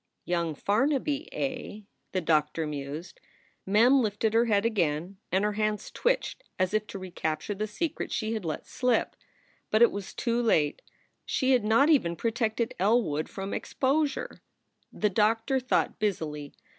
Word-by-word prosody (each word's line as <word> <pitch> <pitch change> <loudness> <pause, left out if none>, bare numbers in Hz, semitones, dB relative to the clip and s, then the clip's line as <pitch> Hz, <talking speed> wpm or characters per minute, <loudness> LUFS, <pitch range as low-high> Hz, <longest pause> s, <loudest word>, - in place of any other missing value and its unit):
"Young 170 -3 -1
Farnaby, 275 - 0
eh?" 255 -5 -4 0.3
the 185 - 0
doctor 155 0 +1
mused. 150 +3 -6 0.5
Mem 240 +7 +5
lifted 215 0 0
her 230 +1 +4
head 210 -2 +2
again, 180 -4 0
and 190 +2 +2
her 210 - +2
hands 210 0 -2
twitched - - -1
as 185 +1 0
if 215 0 0
to - - -7
recapture 175 -1 -3
the 210 +2 -3
secret 315 +9 -3
she 220 -1 -1
had 220 -3 -3
let 160 -2 -4
slip. 250 -2 0 0.5
But 215 +2 +5
it 235 - +6
was 200 -1 -6
too 235 0 0
late; 155 -11 +2 0.4
she 260 -1 +1
had 250 -4 +4
not 230 +9 +4
even 170 - +3
protected 230 +2 -1
Elwood 195 -7 +2
from 195 0 -5
exposure. 280 +1 -1 0.5
The 210 -1 0
doctor 225 +6 +2
thought 250 0 0
busily. 155 -8 -2
215 Hz, 150 wpm, -28 LUFS, 175-240 Hz, 0.5 s, it